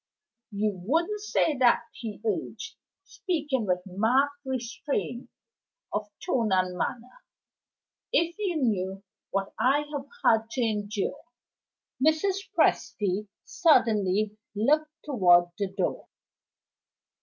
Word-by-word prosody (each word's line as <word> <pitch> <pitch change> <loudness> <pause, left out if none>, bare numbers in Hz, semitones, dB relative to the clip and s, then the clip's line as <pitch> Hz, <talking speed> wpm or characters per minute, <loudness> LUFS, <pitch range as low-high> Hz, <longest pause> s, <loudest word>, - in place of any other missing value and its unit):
"You 210 0 0
wouldn't 335 - +1
say 325 -7 +1
that," 245 -2 +5
he 220 -3 -7
urged, 445 +1 -3 0.3
speaking 295 - -2
with 180 0 0
marked 230 +9 +2
restraint 250 -1 -3 0.6
of 210 0 -2 0.2
tone 235 - +1
and 185 -1 +2
manner, 245 - -4 0.9
"if 340 -8 +2
you 390 -5 -1
knew 195 -8 -1 0.3
what 195 0 -2
I 285 +3 +3
have 280 -1 -4 0.2
had 225 0 +4
to 260 - -1
endure 215 +4 -2 0.4
" 255 - -12
Mrs. 385 +6 +1
Presty 205 0 +1 0.2
suddenly 215 - +3 0.2
looked 300 +9 +2 0.2
toward 175 - +4
the 200 - 0
door. 190 -2 -2
235 Hz, 110 wpm, -27 LUFS, 205-300 Hz, 0.9 s, that